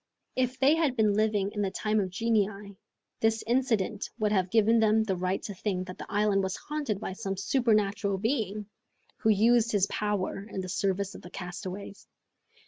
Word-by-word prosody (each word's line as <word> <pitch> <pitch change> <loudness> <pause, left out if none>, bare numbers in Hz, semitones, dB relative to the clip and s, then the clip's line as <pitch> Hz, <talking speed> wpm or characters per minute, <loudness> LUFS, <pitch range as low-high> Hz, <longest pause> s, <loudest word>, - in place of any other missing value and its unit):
If 255 0 0
they 275 +3 +5
had 315 -5 +1
been 215 -3 +3
living 210 -1 +1
in 210 - -3
the 195 - +1
time 215 +2 0
of 190 -2 -1
genii, 205 -1 -1 0.4
this 225 0 +1
incident 225 -4 0
would 215 -2 +1
have 190 -3 +1
given 225 +2 +4
them 220 0 +4
the 195 -3 -1
right 185 +2 -1
to 205 - -5
think 185 -1 -2
that 185 0 -9
the - - -8
island 205 -1 +2
was 190 -1 -2
haunted 290 -9 -3
by 190 - -4
some 195 0 -4
supernatural 205 -3 +1
being, 215 -2 -1 0.5
who 220 - +1
used 230 +2 +4
his 200 -2 +3
power 205 -2 -2
in 190 - -4
the 185 - -6
service 195 +1 -1
of - - -10
the 175 - -11
castaways! 185 +2 -7
210 Hz, 185 wpm, -29 LUFS, 195-225 Hz, 0.5 s, they